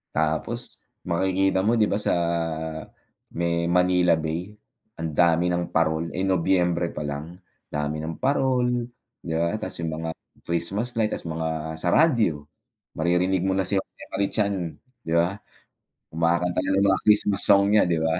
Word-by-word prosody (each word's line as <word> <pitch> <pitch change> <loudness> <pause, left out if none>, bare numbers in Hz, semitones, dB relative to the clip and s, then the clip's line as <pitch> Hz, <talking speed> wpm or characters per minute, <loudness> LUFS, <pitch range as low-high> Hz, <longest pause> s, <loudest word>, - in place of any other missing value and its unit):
Tapos 80 0 -2 0.3
makikita 95 +2 +1
mo 115 - +3
'di 110 -3 +3
ba, 100 - +1
sa 105 - 0 1.2
may 85 0 0
Manila 90 0 +3
Bay 80 +5 -3 0.5
ang 80 - -2
dami 85 0 +4
ng 85 0 -2
parol, 80 0 +1
eh, 95 - -2
Nobyembre 90 -2 +1
palang, 75 +3 -5 0.4
dami 75 +1 -2
ng 80 +1 -6
parol 125 -3 +1 0.4
'di 80 - -3
ba 85 +5 0
tas 95 - -4
'yung 80 - -2
mga 80 0 -4 0.3
Christmas 95 +8 -1
light, 110 -2 +1
tas - - -5
mga 80 -1 -3
sa 90 - +1
radyo, 110 - +3 0.5
maririnig 90 +3 +1
mo 95 +1 0
na 95 - +1
si 100 - -1
Jose - - -15
Marie 100 0 0
Chan, 100 -2 0 0.5
'di 80 - -4
ba, 85 +3 +2 0.8
kumakanta 85 +2 0
na - - 0
ng 95 - +3
mga 95 - +2
Christmas 105 -1 +4
song 100 0 +5
niya, 105 -2 +5
'di 85 -2 +1
ba. 80 0 +1
90 Hz, 160 wpm, -25 LUFS, 80-100 Hz, 1.2 s, song